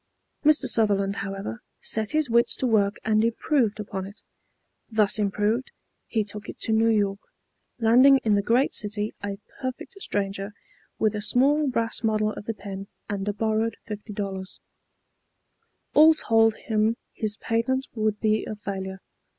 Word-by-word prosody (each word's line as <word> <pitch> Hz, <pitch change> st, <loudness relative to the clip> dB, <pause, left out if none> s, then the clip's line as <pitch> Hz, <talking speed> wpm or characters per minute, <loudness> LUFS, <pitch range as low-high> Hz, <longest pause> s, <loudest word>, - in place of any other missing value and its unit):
Mr. 305 Hz, 0 st, +5 dB
Sutherland, 200 Hz, -3 st, +2 dB
however, 195 Hz, -, -5 dB, 0.2 s
set 220 Hz, -1 st, 0 dB
his 310 Hz, -2 st, +1 dB
wits 235 Hz, 0 st, +3 dB
to -, -, -1 dB
work 210 Hz, -4 st, +2 dB
and 215 Hz, 0 st, +3 dB
improved 230 Hz, -1 st, +1 dB
upon 195 Hz, -2 st, -5 dB
it. 205 Hz, -, -11 dB, 0.7 s
Thus 215 Hz, -2 st, +2 dB
improved, 210 Hz, +4 st, 0 dB, 0.4 s
he 220 Hz, -2 st, 0 dB
took 210 Hz, 0 st, -8 dB
it -, -, -8 dB
to -, -, -1 dB
New 225 Hz, +1 st, +4 dB
York, 200 Hz, -3 st, +1 dB, 0.6 s
landing 250 Hz, +4 st, +6 dB
in 215 Hz, -, +2 dB
the 200 Hz, -, +3 dB
great 240 Hz, +6 st, +2 dB
city 210 Hz, 0 st, 0 dB
a 200 Hz, -1 st, -3 dB, 0.2 s
perfect 255 Hz, -1 st, -5 dB
stranger, 195 Hz, -, -3 dB, 0.4 s
with 215 Hz, -2 st, +1 dB
a 210 Hz, -, -3 dB
small 280 Hz, +7 st, +3 dB
brass 230 Hz, -2 st, -1 dB
model 215 Hz, -1 st, +1 dB
of 205 Hz, -, -8 dB
the 225 Hz, -, -3 dB
pen 195 Hz, -1 st, -7 dB, 0.2 s
and 200 Hz, -1 st, -3 dB
a -, -, +2 dB
borrowed 220 Hz, +2 st, 0 dB
$50. 205 Hz, -3 st, -5 dB, 1.3 s
All 315 Hz, +1 st, +7 dB
told 225 Hz, -5 st, +3 dB
him 220 Hz, +1 st, 0 dB, 0.2 s
his 215 Hz, -1 st, -3 dB
patent 260 Hz, +4 st, 0 dB
would 215 Hz, -2 st, -1 dB
be 215 Hz, -1 st, +1 dB
a 215 Hz, -, -4 dB
failure. 195 Hz, -2 st, -6 dB
215 Hz, 150 wpm, -25 LUFS, 205-230 Hz, 1.3 s, All